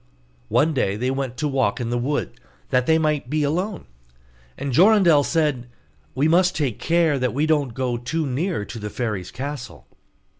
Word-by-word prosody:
One 155 +2 +2
day 100 -8 0
they 125 +5 -1
went 135 -2 -3
to 150 - -1
walk 130 -7 0
in 120 -1 -3
the 120 - 0
wood, 145 +4 -2 0.3
that 125 0 +2
they 160 - +5
might 150 -5 0
be 150 +1 0
alone; 180 +7 -2 0.7
and 140 -2 -3
Jorindel 180 - +5
said, 150 -8 0 0.5
'We 140 +4 +2
must 180 +3 +3
take 140 -8 -1
care 165 -4 +2
that 125 -1 -1
we 145 +3 +1
don't 145 -7 0
go 125 -2 -1
too 155 +7 -2
near 140 - -2
to 115 - -8
the 105 0 -5
fairy's 105 -6 -3
castle. 135 - -7
140 Hz, 180 wpm, -22 LUFS, 125-160 Hz, 0.7 s, they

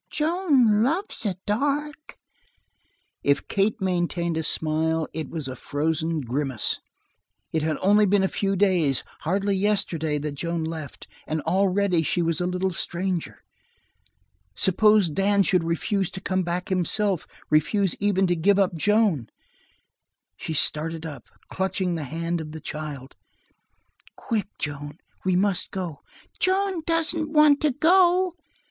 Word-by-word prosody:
Joan 300 - +2
loves 330 - 0
the 195 -5 -2
dark." 290 +7 -2 1.0
If 140 0 +1
Kate 210 +5 0
maintained 175 -2 -1
a 160 - 0
smile, 160 +1 -1
it 155 -3 -4
was 155 -5 -5
a 130 - -5
frozen 160 +4 -1
grimace. 130 -1 -1 0.7
It 160 - 0
had 155 0 -1
only 205 +2 +4
been 195 0 +3
a - - +3
few 195 +1 -1
days 180 -9 +2 0.2
hardly 195 +4 0
yesterday 180 -6 0
that 150 0 -4
Joan 170 +3 -3
left, 160 -3 -7 0.2
and 155 +1 -1
already 190 +1 +2
she 170 +2 0
was 165 +1 0
a 180 - 0
little 180 +1 -1
stranger. 175 0 -3 1.1
Suppose 210 +1 +4
Dan 195 +5 +2
should 185 -4 +2
refuse 175 +3 -1
to 190 - -7
come 190 -1 -1
back 180 +1 -3
himself; 190 0 0 0.2
refuse 155 +6 +2
even 195 -1 +2
to 175 -1 +1
give 195 +4 +3
up 195 -3 +2
Joan! 200 - +1 1.1
She 160 - -5
started 160 +2 +1
up, 150 -3 -8 0.2
clutching 190 -1 -1
the 160 -3 -3
hand 165 +4 -3
of 155 -1 -8
the 160 - -6
child. 145 -4 -7 1.0
"Quick, 220 -5 -2
Joan, 145 0 -5 0.3
we 185 -1 +1
must 195 0 +1
go!" 180 -6 -5 0.4
"Joan 380 -1 +1
doesn't 330 -1 +1
want 300 -2 +5
to 305 - +3
go!" 355 +5 +4
180 Hz, 140 wpm, -25 LUFS, 160-205 Hz, 1.1 s, want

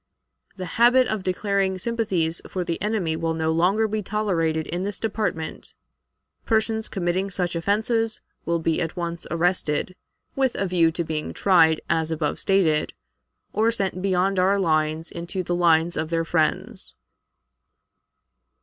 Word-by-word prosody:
"The 185 - -5 0.2
habit 250 +2 +6
of 220 -4 -2
declaring 190 0 0
sympathies 185 -7 -1
for 185 - -2
the 170 -1 -3
enemy 205 -7 0
will 165 0 -1
no 160 0 0
longer 190 +7 +2
be 215 0 -2
tolerated 175 -6 0
in 175 +2 -3
this 200 -1 -3
department. 210 -7 -3 0.7
Persons 220 0 0
committing 185 +1 -1
such 180 -2 -2
offenses 220 +5 0 0.2
will 170 0 0
be 165 -1 0
at 165 -2 -3
once 170 -1 -4
arrested, 170 0 0 0.4
with 265 -2 +1
a 195 - -1
view 175 -3 +3
to 170 +1 -2
being 155 -1 -4
tried 165 -5 +4
as 160 -1 0
above 155 -2 -2
stated, 165 -6 +2 0.6
or 220 +2 +3
sent 195 -5 -1
beyond 190 0 +1
our 190 +2 +3
lines 155 -3 0
into 175 +2 -4
the 175 - -2
lines 170 -1 +3
of 160 0 -2
their 165 0 0
friends. 160 -2 -1
180 Hz, 145 wpm, -24 LUFS, 165-200 Hz, 0.7 s, habit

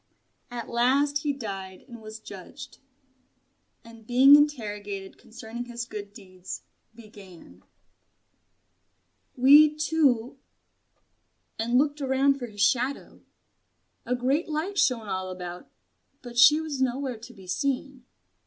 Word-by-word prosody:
And 245 0 -6
at - - -7
last 275 +5 +2
he 295 0 -1
died 195 -8 -7
and 235 -3 -11
was 215 0 -9
judged: 220 +7 -11 1.1
and 230 -1 -15
being 265 +3 +7
interrogated 205 -9 -1
concerning 235 +1 -9
his 240 -1 -6
good 205 -3 -8
deeds, 185 -4 -10 0.3
began 195 - -15 1.8
"We 295 +4 +7
two 280 -6 +1 0.6
" - - -46
and 235 +2 +1
looked 290 +2 +1
around 275 +1 +2
for 245 - -5
his 205 -2 -8
shadow. 255 +5 0 0.8
A 250 - -1
great 270 +7 0
light 330 +6 -2
shone 230 -4 +1
all 185 -1 -3
about; 180 -1 -8 0.5
but 240 -1 -10
she 270 +6 +7
was 305 -4 -5
nowhere 260 -1 -1
to 240 +2 -12
be 190 -2 -14
seen. 270 +5 -3
245 Hz, 125 wpm, -26 LUFS, 210-275 Hz, 1.8 s, being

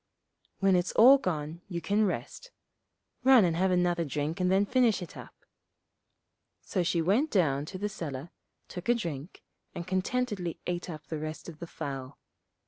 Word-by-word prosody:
When 195 -1 +4
it's 180 0 0
all 265 +5 +8
gone 160 - -3
you 175 -3 -4
can 205 +6 +1
rest; 485 - -5 0.7
run 255 -5 +7
and 170 -2 +1
have 190 +3 +2
another 175 -1 +2
drink 150 +2 -3
and 180 0 +2
then 195 +2 +4
finish 240 -1 +3
it 175 - -11
up.' - - -12 1.2
So 185 - -1
she 170 -1 +1
went 225 - +2
down 145 - +1
to 185 - -7
the 205 +2 -2
cellar, 155 -6 -6 0.4
took 180 -1 -8
a 240 - +4
good - - -2
drink, 165 - -6 0.3
and 170 - -5
contentedly 190 -1 -2
ate 175 0 -3
up 155 -2 -8
the 160 - -5
rest 155 +1 -6
of 160 -3 -10
the 170 - -7
fowl. 135 -3 -6
175 Hz, 175 wpm, -29 LUFS, 160-200 Hz, 1.2 s, all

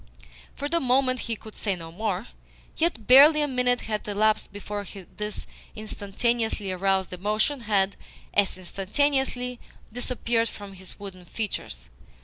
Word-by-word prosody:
For 285 - -3
the 335 +3 +2
moment 255 -1 +2
he 230 - +1
could 220 0 -12
say 200 -3 0
no 165 -2 -9
more. 200 +2 -2 0.5
Yet 320 -10 0
barely 285 +6 +9
a 295 - +2
minute 250 -2 +1
had 215 -1 -3
elapsed 215 +1 +2
before 205 0 -5 0.3
this 210 0 -4 0.3
instantaneously 215 0 -1
aroused 190 0 +1
emotion 215 +9 0
had, 200 -4 +1 0.4
as 200 -2 +2
instantaneously, 250 +6 0 0.3
disappeared 235 -1 0
from 205 -1 -9
his 190 +1 -9
wooden 190 -3 -8
features. 65 - -5
215 Hz, 130 wpm, -26 LUFS, 195-250 Hz, 0.5 s, barely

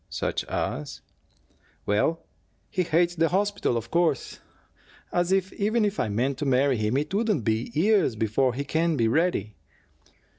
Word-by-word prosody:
"Such - - -2
as 75 0 -4 0.4
" - - -37
"Well, 155 +11 0 0.5
he 190 - 0
HATES 170 +1 +1
the 165 0 +3
hospital, 200 -8 0
of 115 0 -6
course. 170 -6 0 0.7
As 175 +1 0
if, 190 0 +1
even 215 +2 +1
if 205 0 -2
I - - 0
meant 125 +6 -1
to 150 - -2
marry 135 0 +3
him, 110 +4 0
it 150 +5 -2
wouldn't 210 - +1
be 110 +2 -1
years 195 - +3
before 115 +4 +1
he 140 - -2
can 160 +2 0
be 115 - +2
ready." 115 - 0
155 Hz, 160 wpm, -26 LUFS, 115-180 Hz, 0.7 s, the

